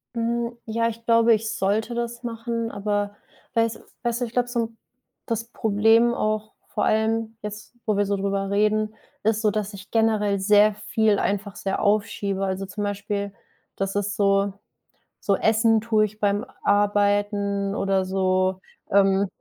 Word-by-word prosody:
Hm, 235 +1 -1
ja, 230 +1 0
ich 230 0 -6
glaube, 230 0 +5
ich 220 0 -1
sollte 215 +5 0
das 235 0 -4
machen, 230 0 -3
aber 205 0 -2 0.4
weiß 230 -1 +1 0.2
weißt 240 +1 -1
du, - - +1
ich 225 - -9
glaube, 245 0 +1
so 245 -1 -2
'n 225 0 -3 0.5
das 230 -1 -2
Problem 225 +1 +3
auch, 215 0 -1 0.2
vor 210 - -1
allem 220 +1 +1
jetzt, 210 +2 -8
wo 215 -2 +1
wir 205 0 +2
so 200 0 0
drüber 195 0 -1
reden, 215 +1 +1 0.3
ist 220 0 +2
so, 215 -2 +3
dass 210 -1 -3
ich 195 -1 -11
generell 215 -3 +2
sehr 210 +2 +5
viel 210 0 +1
einfach 200 0 -2
sehr 195 +2 -2
aufschiebe. 205 -2 0
Also, 190 0 -2
zum 205 +2 -5
Beispiel, 200 0 -3 0.4
dass 195 0 -2
es 205 0 -1
so 200 -1 +2 0.7
so 200 - +1
Essen 225 0 +3
tue 215 -1 +2
ich 215 +1 -9
beim 205 0 +1 0.2
Arbeiten 205 -1 +1
oder 195 -2 +1
so 185 0 +1 0.3
ähm, 195 0 +4
210 Hz, 160 wpm, -24 LUFS, 200-225 Hz, 0.7 s, glaube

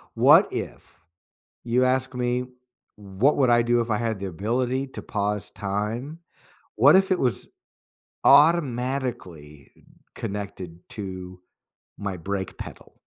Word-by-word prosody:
what - - +6
if - - -8 0.6
you 125 +2 +2
ask 130 0 0
me, 125 0 -1 0.5
"What 105 +7 0
would 130 -4 +3
I 120 0 +5
do 120 0 +2
if 115 0 -3
I 105 - +2
had 115 -3 -2
the 100 - -5
ability 125 +9 -2
to - - -9
pause 105 -2 -3
time?" 110 +10 -4 0.6
What - - +6
if 190 +1 +2
it 185 - +2
was 120 -7 -1 0.8
automatically 125 - +1 0.4
connected 95 -4 -6
to 95 -3 -7 0.6
my 100 -2 -4
brake 95 +2 -4
pedal? - - -11
115 Hz, 125 wpm, -24 LUFS, 95-130 Hz, 0.8 s, what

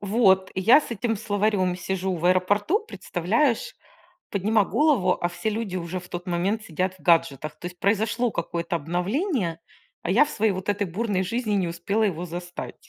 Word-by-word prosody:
Вот, 195 -2 +3
я 225 +10 +6
с - - -9
этим 230 0 -1
словарем 205 -3 0
сижу 190 +1 -2
в 165 - -7
аэропорту, 205 - +2
представляешь, 230 - 0 0.6
поднимаю 205 +1 +2
голову, 275 -12 +3
а 175 - +1
все 175 +5 -3
люди 210 -4 -3
уже 175 +1 -4
в 180 - -14
тот 175 +1 -6
момент 190 +5 0
сидят 185 0 -2
в - - -23
гаджетах. 155 -3 +2
То 175 - -6
есть 180 0 -12
произошло 225 +4 +1
какое-то 170 0 -3
обновление, 180 - -1 0.4
а 170 - -2
я 240 +10 +6
в - - -8
своей 220 -4 +1
вот 185 0 -5
этой 205 0 0
бурной 195 +1 -1
жизни 215 +2 -2
не 190 -3 +1
успела 175 +6 -1
его 180 -4 -1
застать. 175 +1 -7
190 Hz, 175 wpm, -25 LUFS, 175-220 Hz, 0.6 s, я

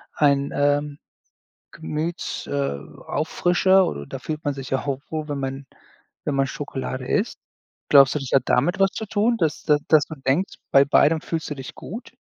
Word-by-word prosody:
ein, 140 -1 +2
ähm, 145 0 +1 0.7
Gemüts 160 +2 -4
äh, 140 - -1 0.3
Auffrischer, 185 +2 +3
oder 70 - -5
da 135 - -6
fühlt 155 +3 -5
man 145 - +1
sich 135 -2 -7
ja 135 - +2
auch 135 -2 -2
wohl, 155 -1 -4
wenn 145 -1 -2
man 135 +1 -4 0.6
wenn 145 - -1
man 135 0 +2
Schokolade 130 -2 -5
isst. 210 - 0 0.5
Glaubst 140 -2 +7
du, - - +1
das 135 -2 -6
hat 135 - +4
damit 175 +10 +2
was 195 -1 +4
zu 220 - -5
tun, 220 +3 +1
dass 160 -5 -1
da 150 - +4
dass 155 -1 +5
du 160 - -7
denkst, 165 +9 +1 0.2
bei 140 0 +6
beidem 150 +3 +4
fühlst 165 -1 -4
du - - -2
dich 135 -1 -8
gut? 225 +7 -9
145 Hz, 185 wpm, -23 LUFS, 135-165 Hz, 0.7 s, Glaubst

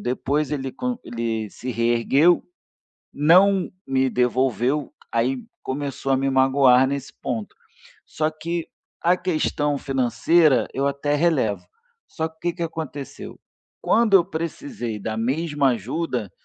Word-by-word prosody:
Depois 140 +4 -1
ele 135 -3 -3
con 250 -1 -3
ele 115 -2 -3
se 125 - -6
reergueu, 120 +8 +3 0.7
não 185 +6 +4 0.2
me 135 0 +1
devolveu, 130 +3 0 0.2
aí 125 +3 0 0.2
começou 135 0 -3
a 135 - +3
me 135 +1 0
magoar 130 -1 +4
nesse 140 0 -4
ponto. 115 -5 -4 0.5
Só 155 0 -1
que 165 +2 -4 0.3
a 175 +2 +3
questão 155 -5 -1
financeira 135 +1 +2
eu 135 +1 0
até 140 +1 0
relevo. 145 -10 +1 0.4
Só 160 - -3
que 160 - -24
o - - -40
que 175 0 -1
que 170 - -5
aconteceu? 155 -4 -6 0.4
Quando 225 -2 +3
eu 175 - +4
precisei 165 - -5
da 110 +2 -4
mesma 140 +4 0
ajuda, 120 - -3
140 Hz, 130 wpm, -23 LUFS, 125-160 Hz, 0.7 s, não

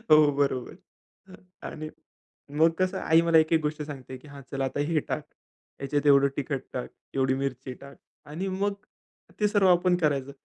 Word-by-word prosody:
हो, 150 -1 +6
बरोबर. 135 -3 0 0.9
आणि 155 0 -6 0.7
मग 165 +1 +6
कसं 185 +1 +1
आई 160 +1 +4
मला 165 -1 +4
एक, 160 +1 +3
एक 160 - +4
गोष्ट 150 0 -2
सांगते, 130 -3 -8
की 150 - -17
"हां, 140 0 -11
चल 135 -1 -3
आता 135 +2 -2
हे 165 -2 +2
टाक, - - -4 0.6
ह्याच्यात 145 +1 -1
एवढं 140 0 +6
तिखट 140 -1 -2
टाक, 125 - -4 0.2
एवढी 130 -1 +2
मिरची 130 -1 -4
टाक." 140 +2 -13 0.3
आणि 165 +6 -4
मग 200 +2 -1 0.7
ते 210 - +3
सर्व 205 -2 +3
आपण 180 0 +4
करायचं. 140 -5 0
150 Hz, 170 wpm, -27 LUFS, 135-165 Hz, 0.9 s, हो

